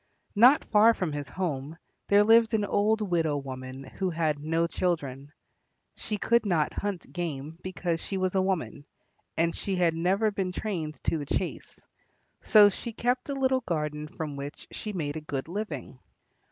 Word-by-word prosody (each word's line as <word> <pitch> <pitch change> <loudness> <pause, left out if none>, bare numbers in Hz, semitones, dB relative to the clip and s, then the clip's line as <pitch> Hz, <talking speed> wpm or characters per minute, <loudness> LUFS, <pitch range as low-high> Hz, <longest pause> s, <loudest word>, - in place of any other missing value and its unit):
Not 250 +8 +6
far 220 +2 +5
from 180 -4 -2
his 145 -1 -5
home 155 -4 -3 0.3
there 205 +1 +6
lived 225 +1 +5
alone 210 - +1
an 205 - -3
old 215 +2 +2
widow 165 -7 +1
woman 130 -1 -7
who 185 +8 -3
had 160 -3 0
no 165 +3 0
children. 145 -6 -2 0.6
She 210 - -4
could 235 +3 +2
not 170 -7 +1
hunt 200 -3 -4
game 160 -2 -4
because 175 -2 -2
she 195 - -3
was 185 -1 0
a 190 - +3
woman, 185 -6 -2 0.5
and 165 +1 +2
she 195 - -2
had 175 -2 +2
never 190 +6 +1
been 190 -2 -2
trained 165 -9 -3
to 165 - 0
the 145 - -6
chase, 185 - -3 0.6
so 210 -2 +7
she 225 +4 -4
kept 250 +4 -1
a 280 - -1
little 260 -1 +2
garden 150 -4 -3
from 150 -1 -6
which 140 +1 -7
she 215 - -5
made 155 -6 -3
a - - -5
good 140 -2 -4
living. 165 - -5
175 Hz, 175 wpm, -28 LUFS, 150-205 Hz, 0.6 s, so